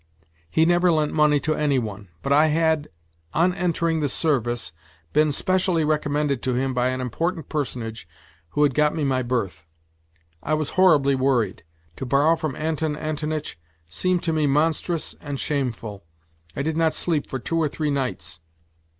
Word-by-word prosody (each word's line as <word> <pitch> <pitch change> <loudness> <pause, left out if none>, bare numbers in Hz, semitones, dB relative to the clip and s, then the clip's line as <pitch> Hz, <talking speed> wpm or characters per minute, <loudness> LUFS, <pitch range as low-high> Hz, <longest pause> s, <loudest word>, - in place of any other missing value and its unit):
He 160 - +3
never 175 +1 +4
lent 155 -2 +1
money 150 -1 +4
to 155 - 0
any 150 -3 +1
one, 105 -4 -4 0.2
but 140 - +1
I 150 +2 +5
had, 160 -1 +1 0.5
on 175 +3 +3
entering 170 -2 0
the 145 -2 0
service, 120 -6 0 0.4
been 150 0 +4
specially 180 +1 +1
recommended 150 -3 0
to 130 -1 -1
him 130 +1 0
by 125 0 +1
an 130 0 -1
important 160 +6 -2
personage 120 - -4 0.4
who 145 - +1
had 145 -3 +3
got 150 +2 +2
me 155 - -1
my 130 -2 +1
berth. 115 -10 -3 0.7
I 155 - 0
was 155 -1 -2
horribly 155 -7 +4
worried. 130 -7 +1 0.4
To 135 - -5
borrow 145 +5 +4
from 155 -4 -3
Anton 155 -1 -1
Antonitch 155 - -4 0.3
seemed 180 - 0
to 165 - 0
me 155 -2 +2
monstrous 160 +3 0
and 145 -2 -5
shameful. 115 - -3 0.5
I 140 - -2
did 160 +1 -1
not 160 -1 +2
sleep 160 -4 0
for 130 - -3
two 165 +6 -2
or 155 - +2
three 150 0 -2
nights. 85 - -3
150 Hz, 165 wpm, -23 LUFS, 130-160 Hz, 0.7 s, I